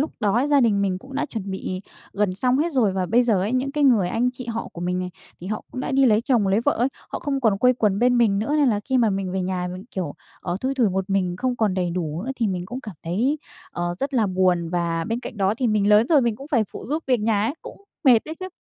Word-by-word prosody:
lúc 300 - 0
đó 205 -1 +1
ấy, 255 +4 +2
gia 285 -2 +4
đình 210 -4 +3
mình 185 -2 0
cũng 270 +6 -13
đã 275 - -1
chuẩn 205 -8 -5
bị 185 -1 -4 0.3
gần 200 -2 0
xong 250 +6 +1
hết 330 +1 0
rồi. 225 -8 +2
Và 185 -1 -1
bây 240 +5 +4
giờ 220 -6 +2
ấy, 210 +6 -1
những 265 +2 0
cái 295 -1 +1
người 215 -9 +4
anh 245 +5 +1
chị 250 -1 -9
họ 230 0 -4
của 170 - -9
mình 180 +1 -1
này, 180 0 -3 0.3
thì 180 - -8
họ 215 +1 -4
cũng 255 - -4
đã 270 - -3
đi 270 0 +4
lấy 215 -1 +4
chồng, 235 -5 +1
lấy 200 +4 +3
vợ 285 +4 +2
ấy, 245 +3 +1 0.2
họ - - -4
không 275 -2 -2
còn 215 -5 +2
quây 250 +2 +5
quần 205 -4 +1
bên 245 0 +3
mình 210 -4 +3
nữa, 230 +9 -1
nên 285 -3 +4
là 205 -2 +1
khi 260 -1 +2
mà 225 -3 +3
mình 195 -1 -2
về 190 -1 -1
nhà 180 -1 -2
mình, 185 +3 -8
kiểu, 175 -7 -4 0.3
ờ, 175 - -3
thui 265 +1 -1
thủi 245 -5 +3
một 190 +1 -2
mình, 180 -2 0
không 250 +1 -1
còn 210 -4 +1
đầy 180 -2 -1
đủ 170 -1 -3
nữa 265 - -4
thì 230 - +1
mình 180 -2 -3
cũng 250 +5 -6
cảm 215 -6 -9
thấy, 235 - 0 0.3
ờ, 175 0 -3
rất 275 0 -3
là 225 -4 +3
buồn. 180 -3 +1
Và 170 -1 -1
bên 230 +2 -2
cạnh 235 - -8
đó 195 +1 +1
thì 250 - 0
mình 210 -2 +2
lớn 210 +3 +5
rồi 310 -4 +5
mình 235 -4 0
cũng 275 +2 -10
phải 235 -8 +2
phụ - - -8
giúp 310 +4 -1
việc 250 -3 +2
nhà 210 -1 +1
ấy, 270 - -1
cũng 400 - -11 0.2
mệt 245 -4 +7
đấy 315 - -6
chứ. 370 - -4
215 Hz, 300 wpm, -23 LUFS, 190-255 Hz, 0.3 s, mệt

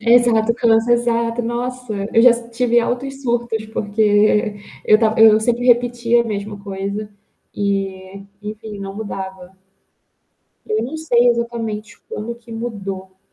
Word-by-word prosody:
Exato, 230 -1 +4
cansa 230 0 +2
exato. 235 0 +1
Nossa, 245 0 -4 0.2
eu 230 - +6
já 245 0 +8
s 235 0 -4
tive 240 0 +2
altos 270 +3 -3
surtos 235 -3 -1
porque 215 0 -3
e 210 0 +3
e - - -16 0.3
eu 215 - +7
estava 220 0 +1
eu 220 -1 +7
sempre 240 +2 0
repetia 240 -1 +3
a - - -3
mesma 205 -2 -5
coisa, 200 +1 -5 0.5
e, 195 -1 -3 0.2
enfim, 210 0 -7
não 195 0 -6
mudava. 190 -3 -7 1.1
Eu 215 +1 0
não 280 +6 -5
sei 245 -6 +3
exatamente 230 -2 -2
quando 230 +2 -5
que 235 -1 -14
mudou. 195 -5 -6
225 Hz, 145 wpm, -19 LUFS, 205-240 Hz, 1.1 s, já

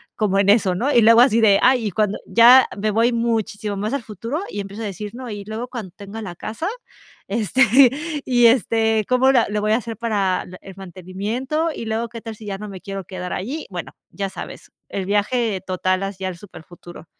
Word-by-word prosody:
como 200 -3 0
en 200 0 +3
eso, 200 -4 +4
¿no? 265 +9 0
Y 235 - +6
luego 230 +2 +7
así 230 -3 +4
de 205 -3 +5
ay, 250 -4 +4
y - - -3
cuando 210 +1 0
ya 245 +3 +7
me 215 +1 0
voy 230 +3 +2
muchísimo 220 -3 -2
más 215 +5 -3
al 275 -4 -2
futuro 230 - -5
y 205 - -6
empiezo 200 +3 -6
a - - -3
decir: 205 +1 -6
"No, 255 -2 -7
y 205 -2 -7
luego 225 +3 -5
cuando 215 -8 -7
tenga 205 +2 -8
la 175 -4 -7
casa, 225 - -5 0.6
este 230 +5 +2 0.6
y 240 -2 +5
este 225 -2 +2
¿cómo 255 +1 +4
lo 255 - +4
le 210 0 -1
voy 215 0 0
a 220 - +4
hacer 230 -2 -6
para 200 -5 0 0.2
el 195 -1 -12
mantenimiento? 200 - -3
Y 230 - -7
luego, 225 +1 -2
¿qué 230 -1 -8
tal 225 -1 -7
si 215 - -13
ya 195 -1 -4
no 210 +1 -7
me 190 -2 -9
quiero 195 -2 -6
quedar 180 -1 -6
allí?". 265 +12 -4
Bueno, 175 -2 -7 0.2
ya 195 -1 -4
sabes, 190 - -9 0.2
el 195 -2 -4
viaje 210 0 0
total 185 +1 -1
así 195 -1 -5
al 185 -2 -3
superfuturo. 175 -2 -13
215 Hz, 215 wpm, -21 LUFS, 195-235 Hz, 0.6 s, luego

